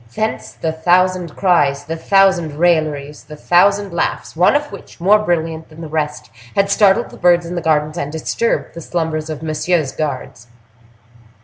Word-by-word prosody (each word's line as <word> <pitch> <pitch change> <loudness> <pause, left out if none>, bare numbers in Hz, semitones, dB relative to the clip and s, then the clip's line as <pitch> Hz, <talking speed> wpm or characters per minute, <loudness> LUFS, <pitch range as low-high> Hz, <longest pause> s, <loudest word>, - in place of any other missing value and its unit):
Thence 220 0 -3
the 160 - -3
thousand 180 +1 +1
cries, 145 -7 +2
the 165 - -4
thousand 190 -2 +2
railleries, 155 -4 0
the 150 - -10
thousand 200 +4 +2
laughs, 170 - -2
one 180 - +4
of 295 0 -1
which, - - -12
more 200 +5 +4
brilliant 165 -5 -2
than 160 +1 -13
the 160 - -6
rest, 150 -5 -3 0.2
had 200 0 +2
startled 205 +3 +3
the - - -12
birds 175 -1 +3
in 170 - -6
the 175 - -3
gardens, 155 0 0
and 145 +1 -4
disturbed 160 +8 -2
the 170 - -8
slumbers 160 -2 -3
of 155 0 -6
Monsieur's 155 -1 0
guards. 130 -5 -5
165 Hz, 170 wpm, -17 LUFS, 155-185 Hz, 0.2 s, one